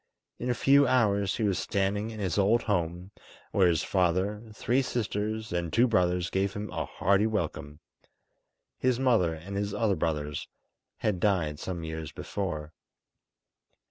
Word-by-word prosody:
In 125 - -3
a 120 - +1
few 140 +3 +5
hours 100 -6 +2
he 115 - -1
was 100 -3 +1
standing 100 +2 -1
in 110 -1 -8
his 95 -2 0
old 110 +4 +3
home, 90 -2 -2 0.4
where 95 -2 +4
his 85 -3 +2
father, 95 +3 +1
three 120 +5 +1
sisters, 110 -4 -2
and 85 -2 -1
two 115 +10 +4
brothers 90 -6 +1
gave 95 0 0
him 105 +1 -5
a - - -2
hearty 100 +4 +2
welcome. 80 -8 -3 1.0
His 130 -1 +1
mother 110 -11 +3
and 90 +5 -8
his 100 0 -2
other 110 -4 +2
brothers 75 -3 -2 0.5
had 105 -5 -1
died 85 -7 +1
some 85 -1 -4
years 80 -1 -5
before. 85 -6 -4
100 Hz, 150 wpm, -28 LUFS, 85-110 Hz, 1.0 s, few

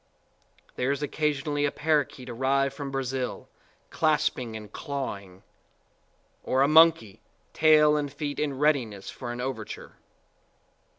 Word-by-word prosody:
There 125 - 0
is 140 +1 -1
occasionally 145 0 -1
a 145 - 0
parrakeet 150 -4 -1
arrived 135 +3 0
from 140 0 -6
Brazil, 135 -1 -3 0.4
clasping 150 -7 0
and 105 -2 -11
clawing; 100 - -6 1.0
or 130 +1 +1
a - - +4
monkeytail 155 +1 +4
and 145 -1 -3
feet 145 0 -4
in 145 -3 -1
readiness 130 -9 0
for 120 -2 -7
an 120 - -6
over 125 -3 -3
ture. - - -10
140 Hz, 120 wpm, -27 LUFS, 125-150 Hz, 1.0 s, a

